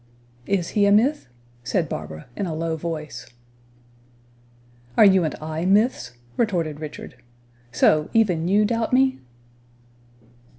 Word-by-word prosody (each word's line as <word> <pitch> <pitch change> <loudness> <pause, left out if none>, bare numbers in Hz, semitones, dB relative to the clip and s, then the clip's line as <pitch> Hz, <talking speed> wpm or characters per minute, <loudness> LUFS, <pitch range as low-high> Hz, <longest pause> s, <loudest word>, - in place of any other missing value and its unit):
"Is 190 -4 0
he 205 -1 +2
a - - +4
myth?" 235 - +2 0.4
said - - -1
Barbara, 80 0 -7
in 200 - -3
a 160 - -4
low 165 0 -2
voice. 155 -6 -6 1.7
"Are - - +8
you 190 -2 +5
and 155 - -2
I 155 +1 -5
myths?" 200 - +2 0.2
retorted 170 -10 -1
Richard. 155 -1 -9 0.5
"So, 150 +5 +3
even 180 -7 +2
you 205 +3 +3
doubt 230 +2 -1
me?" 260 0 +3
175 Hz, 125 wpm, -23 LUFS, 155-215 Hz, 1.7 s, Are